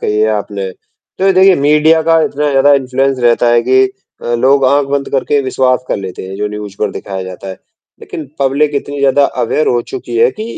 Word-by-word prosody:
कही 105 - -1
है 110 - +2
आपने। 100 -2 -3 0.5
तो 195 +1 +3
देखिए, 190 +1 +5
मीडिया 150 +3 +3
का 165 0 +3
इतना 150 0 -1
ज़्यादा 140 +1 +4
इन्फ्लुएंस 135 0 0
रहता 120 0 +2
है 120 0 +3
कि 130 +2 +3 0.4
अ, - - -7
लोग 135 +3 +2
आँख 140 +2 +2
बंद 140 0 -2
करके 140 +1 0
विश्वास 130 -1 0
कर - - -1
लेते 95 -2 -7
हैं, 95 - -8
जो 105 +1 -2
न्यूज़ 105 -1 -7
पर 105 - -1
दिखाया 95 0 -6
जाता 95 +1 -9
है, 95 - -6 0.5
लेकिन 160 - -7 0.2
पब्लिक 140 +2 +1
इतनी 145 0 -4
ज़्यादा 140 +1 +3 0.2
अवेयर 150 +6 0
हो 120 - +1
चुकी 120 - -5
है 115 - +4
कि 215 - -7
130 Hz, 210 wpm, -13 LUFS, 110-145 Hz, 0.5 s, देखिए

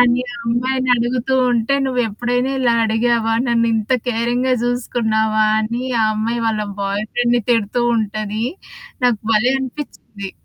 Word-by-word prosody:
అని 245 0 +4
ఆ - - -8
అమ్మాయిని 255 +2 0
అడుగుతూ 245 +2 0 0.2
ఉంటే 235 +4 +1
"నువ్వెప్పుడైనా 245 +1 -1
ఇలా 240 -2 +3
అడిగావా? 225 0 +1
నన్నింత 230 -1 +1 0.2
కేరింగ్‌గా 245 +2 0
చూసుకున్నావా?" 220 -3 +1
అని 235 +3 -3 0.2
ఆ - - +4
అమ్మాయి 230 +2 -1
వాళ్ళ 215 -1 0 0.2
బాయ్ 200 +2 -1
ఫ్రెండ్‌ని 240 -1 +1
తిడుతూ 230 +1 +1
ఉంటది. 215 +1 -2 0.6
నాకు 235 -4 +2
భలే 240 +4 +3
అనిపించింది. 240 -7 -7
235 Hz, 125 wpm, -19 LUFS, 220-245 Hz, 0.6 s, అని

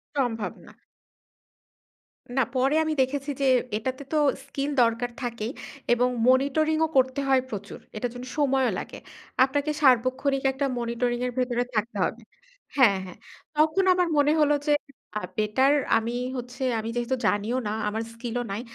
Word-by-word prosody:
সম্ভব 235 -6 -1 0.2
না। - - -13 1.7
না - - +5
পরে 265 +3 +2
আমি 315 0 -1
দেখেছি 275 +2 -1
যে 275 - +2 0.3
এটাতে 260 +5 -4
তো 310 - +1 0.3
স্কিল 280 +1 -3
দরকার 235 +1 +1
থাকেই, 235 -1 -3 0.4
এবং 245 +1 +2 0.2
monitoring 285 +5 +3
ও - - -2
করতে 260 +1 +3
হয় 265 -1 +5
প্রচুর। 200 -3 -7 0.2
এটার 240 +3 -2
জন্য 245 +1 -7
সময়ও 270 -3 +2
লাগে। - - -8 0.5
আপনাকে 285 +3 0
সার্বক্ষণিক 265 +1 +3
একটা 275 +2 -2
monitoring 240 +1 -1
এর 250 - -1
ভেতরে 245 -1 +1
থাকতে 220 +3 -1
হবে - - -4 0.6
হ্যাঁ, 225 -8 +6
হ্যাঁ। 180 - -11 0.4
তখন 315 +5 +3
আমার 360 -1 +2
মনে 290 +1 +4
হল 295 -1 +4 0.2
যে - - +3 0.5
আ - - 0 0.2
বেটার 260 +7 +3 0.2
আমি 230 +1 -2 0.2
হচ্ছে 245 +2 -8 0.2
আমি 220 +1 -4
যেহেতু 240 +2 0
জানিও 210 +4 0
না - - -1 0.2
আমার 220 +2 -2
স্কিল 230 0 -6
ও - - -3
নাই। 205 - -3
255 Hz, 155 wpm, -26 LUFS, 235-275 Hz, 1.7 s, হ্যাঁ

